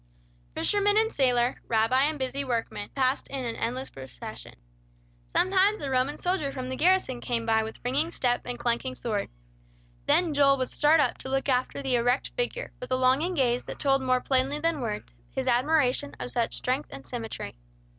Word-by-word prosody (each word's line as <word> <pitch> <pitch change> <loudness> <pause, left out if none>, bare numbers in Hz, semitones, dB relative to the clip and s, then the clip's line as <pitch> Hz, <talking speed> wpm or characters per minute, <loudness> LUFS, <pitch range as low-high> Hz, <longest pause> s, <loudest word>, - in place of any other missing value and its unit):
Fisherman 410 0 +2
and 445 +1 +2
sailor, 250 -2 +2
rabbi 235 +4 +3
and 305 +1 0
busy 265 +1 -2
workman 230 -5 -3
passed 265 0 +1
in 270 -2 -4
an 230 - -3
endless 255 +3 -3
procession. 130 - -9 0.8
Sometimes 390 +3 +3
a 275 -2 -4
Roman 260 +3 +1
soldier 355 -6 -1
from 255 -1 -5
the 260 - -3
garrison 340 -7 +2
came 235 -2 -2
by 225 -1 +3
with 220 0 -5
ringing 285 +6 +1
step 245 -7 0
and 245 0 -4
clanking 235 - -1
sword. 210 - -2 0.8
Then 340 -4 +3
Joel 280 -1 +5
would 255 -1 -2
start 305 +2 +4
up - - +1
to 265 - -6
look 270 +1 0
after 255 +1 0
the 260 -2 +2
erect 245 +2 +1
figure, - - -3
with 250 - -7
a - - +3
longing 265 +8 +2
gaze 250 -4 +2
that - - -7
told 270 -1 +2
more 255 -1 +2
plainly 265 +2 +1
than 320 -1 0
words, 210 - -4 0.2
his - - -2
admiration 255 - +2
of 125 -1 -3
such 230 - -1
strength 260 +3 -1
and 135 0 -9
symmetry. 230 - -6
260 Hz, 185 wpm, -27 LUFS, 240-290 Hz, 0.8 s, Joel